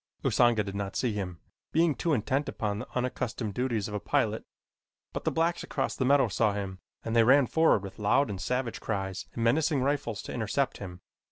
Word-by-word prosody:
Usanga 120 -3 +3
did 100 -1 -6
not 100 0 -4
see 120 -4 0
him, 95 -4 -4 0.3
being 165 0 +3
too 165 - -1
intent 135 +2 0
upon 105 -1 -2
the - - -6
unaccustomed 125 -3 -2
duties 120 -4 -1
of 105 - -7
a 105 - -1
pilot, - - 0 0.7
but - - -5
the - - +2
blacks 165 +1 +1
across - - -2
the 130 - 0
meadow 135 -1 +5
saw 105 0 +1
him 95 -2 -4 0.3
and 115 - -2
they 115 - +6
ran 135 +4 +6
forward 160 -9 +3
with 95 0 -9
loud 135 +7 +3
and 100 -3 -5
savage 125 +3 -2
cries 95 -3 -3
and 115 - -2
menacing 145 +4 +2
rifles 135 -8 -1
to - - -7
intercept - - -1
him. 90 -2 -8
115 Hz, 200 wpm, -29 LUFS, 100-135 Hz, 0.7 s, they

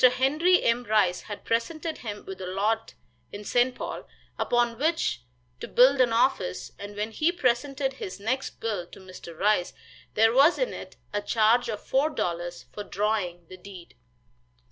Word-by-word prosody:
Henry 275 +9 +4
M. 235 +1 +2
Rice 205 -5 +2
had 205 - -7
presented 310 +8 -2
him 210 -3 -7
with 190 0 -8
a 185 - -5
lot 210 +4 -1 0.4
in 205 +1 -7
St. 245 +4 +2
Paul, - - -6 0.3
upon 240 -1 +1
which 310 - 0 0.4
to - - -6
build 260 +2 +5
an 245 -2 +3
office, 230 -6 0
and 205 0 -8
when 210 +2 -3
he 310 +9 +1
presented 270 -2 0
his 200 -7 -7
next 255 +6 -2
bill 205 -6 -3
to - - -14
Mr. 185 -3 -11
Rice 200 -2 +2 0.4
there 225 +1 +5
was 280 +7 +6
in - - -1
it - - -9 0.2
a 205 - 0
charge 225 +3 +3
of 210 -2 -5
four 275 +4 +2
dollars 175 - -3
for 205 - -5
drawing 195 -4 -2
the 185 - -11
deed. 185 -2 -12
225 Hz, 165 wpm, -27 LUFS, 195-260 Hz, 0.4 s, was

